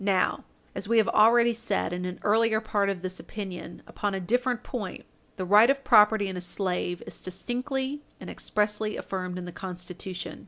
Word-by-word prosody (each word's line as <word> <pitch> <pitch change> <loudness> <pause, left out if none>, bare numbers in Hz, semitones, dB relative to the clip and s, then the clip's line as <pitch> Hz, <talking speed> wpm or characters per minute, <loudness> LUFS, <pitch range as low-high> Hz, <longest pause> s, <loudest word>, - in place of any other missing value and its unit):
Now, 195 -2 +1 0.3
as - - -6
we 230 +1 +3
have 220 - +5
already 235 +2 +5
said 220 -6 -1
in 180 0 -3
an 180 0 -4
earlier 220 +1 +3
part 205 -2 0
of 190 -2 -3
this 185 0 -5
opinion 190 -5 -7
upon 205 -1 -3
a - - -2
different 245 +5 0
point, 210 -8 -5 0.3
the 185 - -3
right 210 +6 +7
of 275 0 +2
property 215 -4 +6
in 190 - -4
a 180 - -4
slave 180 -1 -2
is - - -9
distinctly 260 +8 -3 0.2
and - - -9
expressly 210 0 -1
affirmed 185 -1 -4
in 180 - -5
the 175 - -6
Constitution. 180 0 -7
205 Hz, 185 wpm, -27 LUFS, 185-230 Hz, 0.3 s, right